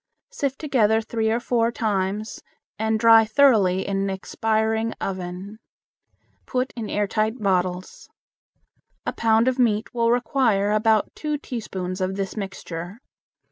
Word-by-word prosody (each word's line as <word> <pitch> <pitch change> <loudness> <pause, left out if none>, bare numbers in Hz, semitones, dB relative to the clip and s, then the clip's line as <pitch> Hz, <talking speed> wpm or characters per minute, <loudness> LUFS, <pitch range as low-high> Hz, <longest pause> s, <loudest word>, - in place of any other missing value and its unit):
Sift 280 - -2
together 225 -7 +2
three 225 0 -1
or 230 +2 +1
four 235 -1 +1
times 210 -2 -2 0.4
and 220 0 0
dry 225 0 +7
thoroughly 215 -6 +3
in 200 -1 -2
an 195 0 0
expiring 220 +3 -1
oven. 190 +2 -5 0.9
Put 255 +1 -1
in 225 -3 -5
air 205 0 0
tight 215 +3 -1
bottles. 185 -2 -2 1.0
A - - -2
pound 225 +1 +2
of 260 0 +1
meat 220 -3 +1
will 230 -1 +1
require 235 -4 +2
about 215 0 +2
two 300 -1 -3
teaspoons 190 -9 -5
of 185 +1 -1
this 195 -1 -4
mixture. 190 -2 -6
220 Hz, 135 wpm, -23 LUFS, 195-230 Hz, 1.0 s, dry